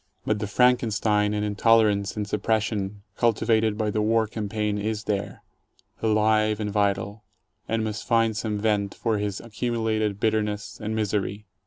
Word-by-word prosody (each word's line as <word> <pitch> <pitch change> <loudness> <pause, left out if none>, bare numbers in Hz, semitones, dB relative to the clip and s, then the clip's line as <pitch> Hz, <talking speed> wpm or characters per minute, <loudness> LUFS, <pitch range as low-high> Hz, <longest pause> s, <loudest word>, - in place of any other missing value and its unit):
But 105 -1 0
the 105 - -3
Franken 125 +2 +3
stein 105 -1 +1
and 105 0 -1
intolerance 105 -1 +3
and 105 -1 -2
suppression 105 -2 -1
cultivated 110 -2 +2
by 110 -1 0
the 105 - 0
war 110 +1 +2
cam 105 -1 -5
paign 105 -1 -1
is 110 0 -2
there, 100 -2 -3 0.6
alive 110 -1 +2
and 105 -1 -2
vital, 100 +1 0 0.5
and 115 0 0
must 105 -1 -4
find 115 -2 +2
some 105 0 -2
vent 105 -2 0
for 110 -3 -1
his 105 -1 -2
accumulated 110 -3 -2
bitterness 105 -1 -1
and 110 +1 -3
misery. 105 -1 -2
105 Hz, 155 wpm, -25 LUFS, 105-110 Hz, 0.6 s, Franken